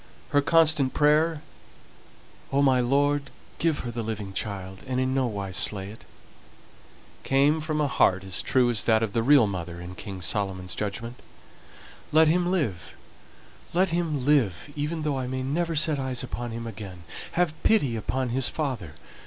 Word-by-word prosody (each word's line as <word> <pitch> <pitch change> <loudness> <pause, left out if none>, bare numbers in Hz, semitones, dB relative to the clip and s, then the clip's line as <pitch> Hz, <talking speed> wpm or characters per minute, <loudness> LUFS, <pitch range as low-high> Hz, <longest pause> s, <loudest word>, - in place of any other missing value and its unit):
Her 145 - +3
constant 155 -3 +3
prayer, 155 +1 +3 1.1
"O 140 +1 +3
my 130 -2 +4
Lord! 140 +3 +1 0.3
give 160 -3 +1
her 120 - -3
the 115 0 -4
living 105 -3 -5
child, 95 -2 -4
and 130 0 -1
in 130 0 0
no 130 -1 +1
wise 100 -4 -4
slay 100 -2 +1
it," 110 - -14 1.2
came 145 +4 +2
from 155 0 -2
a 150 - +2
heart 95 -8 +2
as 95 -1 -1
true 125 -2 +2
as 115 - 0
that 110 -1 +3
of 105 -3 -2
the 115 - +1
real 135 0 +6
mother 90 -3 -5
in 90 +1 -8
King 95 0 -7
Solomon's 95 -3 -1
judgment. 115 +4 -4 0.9
"Let 160 +1 +6
him 175 +2 +2
live, 110 - -2 0.8
let 185 +1 +3
him 160 -6 -1
live, 140 - +1
even 150 +2 -2
though 145 -3 -1
I 130 - -3
may 130 0 -3
never 165 +5 -1
set 150 -1 +2
eyes 130 -1 -2
upon 120 -1 -5
him 115 0 -6
again. 95 -5 -8 0.3
Have 175 -3 +1
pity 145 - +3
upon 130 +4 -2
his 125 +1 +1
father! 125 - -4
130 Hz, 170 wpm, -26 LUFS, 105-150 Hz, 1.2 s, real